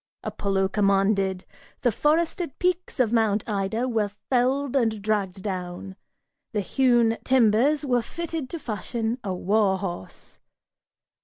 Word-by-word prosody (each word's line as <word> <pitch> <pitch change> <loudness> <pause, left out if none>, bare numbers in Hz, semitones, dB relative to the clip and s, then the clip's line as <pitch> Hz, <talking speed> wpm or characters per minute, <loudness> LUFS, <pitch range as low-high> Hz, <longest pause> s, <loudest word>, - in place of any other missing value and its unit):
Apollo 195 -1 -1
commanded! 195 -1 +1 0.4
The 245 - +3
forested 320 - 0
peaks 360 -4 -1
of 235 -3 +2
Mount 220 -3 +2
Ida 210 +3 -1
Were 220 -4 0 0.2
felled 265 +2 +1
and 225 -5 +1
dragged 200 -2 -1
down; 185 -1 -5 0.6
the 210 - 0
hewn 240 0 +2
timbers 260 +4 +3
were 245 -3 +2
fitted 325 +1 -5
to 335 - -4
fashion 230 - -3
A 195 - -3
war 195 +1 +2
horse. 175 - -7
220 Hz, 125 wpm, -25 LUFS, 195-260 Hz, 0.6 s, The